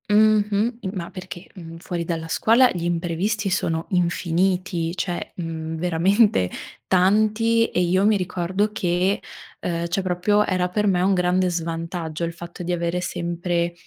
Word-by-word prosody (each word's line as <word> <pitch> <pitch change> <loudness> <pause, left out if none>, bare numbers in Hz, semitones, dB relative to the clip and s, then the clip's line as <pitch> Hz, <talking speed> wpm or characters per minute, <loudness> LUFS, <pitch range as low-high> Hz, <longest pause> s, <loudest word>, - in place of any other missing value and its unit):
Mh-mh, 215 +2 +3
i 195 - -3
ma 175 -4 -5
perché, 185 -1 -9
mhmm, 165 -3 -9
fuori 170 0 -4
dalla 165 -1 -3
scuola 230 +9 +4
gli 175 -2 -4
imprevisti 175 +5 -1
sono 165 -3 -1
infiniti, 180 0 0
cioè, 180 -2 -3
mhmm, 160 -2 -4
veramente 175 - +3 0.4
tanti 215 +5 +3
e - - -2
io 180 +2 +2
mi 215 0 +4
ricordo 185 +3 -1
che, 180 +1 0 0.4
ehm, 170 -1 -2
cioè 185 +3 -1
proprio 190 +3 +2
era 185 -1 0
per 210 +3 0
me 180 -2 +2
un 195 +2 +3
grande 180 0 +2
svantaggio 165 -1 -3
il 170 - -4
fatto 170 +1 -9
di 180 +1 -1
avere 170 0 -1
sempre 175 0 -2
180 Hz, 150 wpm, -23 LUFS, 170-200 Hz, 0.4 s, scuola